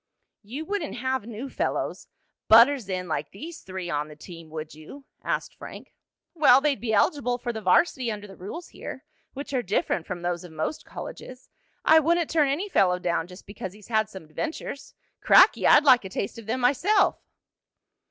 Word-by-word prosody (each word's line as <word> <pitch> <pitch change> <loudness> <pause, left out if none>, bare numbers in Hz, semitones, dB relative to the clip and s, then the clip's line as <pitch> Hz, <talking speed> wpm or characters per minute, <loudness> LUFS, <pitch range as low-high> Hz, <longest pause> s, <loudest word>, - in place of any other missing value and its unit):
"You 255 +10 -7
wouldn't 390 -5 -3
have 260 -2 -2
new 235 +3 -6
fellows - - -3 0.4
butters 235 -1 +6
in 185 -1 -3
like 150 -2 -3
these 320 - -9
three 185 -1 -6
on 150 -2 -2
the 150 - -12
team; 165 +1 -12
would 155 0 -7
you?" 155 - -12 0.2
asked - - -2
Frank. - - -11 0.4
"Well, 295 -6 +6
they'd 285 -1 0
be 230 -2 -2
eligible 245 +3 +2
for 240 -1 -4
the 220 - -5
varsity 235 - +2
under 210 -1 -6
the 195 -2 -12
rules 210 - -8
here, - - -9 0.3
which 280 +1 -7
are 255 - +1
different 190 -5 -1
from 175 -2 -5
those 175 0 -2
of 175 -3 -12
most 155 - -4
colleges. 255 0 -9 0.4
I 320 +1 +7
wouldn't 335 +1 +1
turn 300 -4 +3
any 320 +9 -1
fellow 190 - +3
down 170 -2 -1
just 180 +1 -13
because 190 -2 -7
he'd 210 +1 -16
had 220 -1 +1
some 190 -5 -10
adventures. 280 - -6 0.3
Cracky! - - +6
I'd 295 - +7
like 255 -5 +6
a 190 - -7
taste 195 +4 -4
of 220 - -12
them 255 +3 -1
myself!" 285 +12 +3
225 Hz, 185 wpm, -26 LUFS, 180-280 Hz, 0.4 s, I